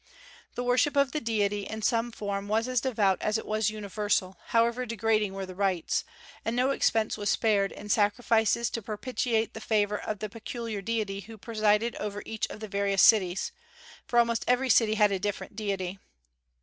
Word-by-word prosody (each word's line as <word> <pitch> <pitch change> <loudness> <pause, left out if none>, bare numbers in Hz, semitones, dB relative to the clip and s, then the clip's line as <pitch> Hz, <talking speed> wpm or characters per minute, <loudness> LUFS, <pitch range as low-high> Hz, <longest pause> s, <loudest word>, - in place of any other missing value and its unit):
The 245 - -2
worship 255 +4 +2
of 280 -1 +3
the 305 - -2
Deity, 205 -3 0
in 220 0 -6
some 230 +1 +1
form, 200 -2 -4
was 220 +3 +1
as 255 -2 +1
devout 210 -8 +1
as 215 +1 +1
it - - -6
was 215 -1 +1
universal, 205 -2 -1
however 235 +2 +2
degrading 220 -3 0
were 195 0 -4
the 185 - -9
rites; 190 -3 0 0.4
and 225 - -2
no 255 +2 +2
expense 225 -5 +1
was 205 -1 -1
spared 200 -2 +2
in 210 - -9
sacrifices 220 +2 +2
to 230 - -3
propitiate 225 +1 -1
the 220 - -8
favor 210 -1 +1
of 215 - -4
the 215 - -4
peculiar 230 0 -5
deity 210 -2 -2
who 220 +2 -10
presided 215 +1 +1
over 205 -1 -4
each 220 -1 -3
of 215 - -10
the 215 - -5
various 200 -1 +2
cities, 190 -4 +4 0.6
for 240 - 0
almost 235 -1 +3
every 250 +1 +3
city 220 -1 +4
had 210 -1 +4
a 195 - 0
different 205 +1 -4
deity. 195 -3 -3
215 Hz, 185 wpm, -28 LUFS, 205-230 Hz, 0.6 s, cities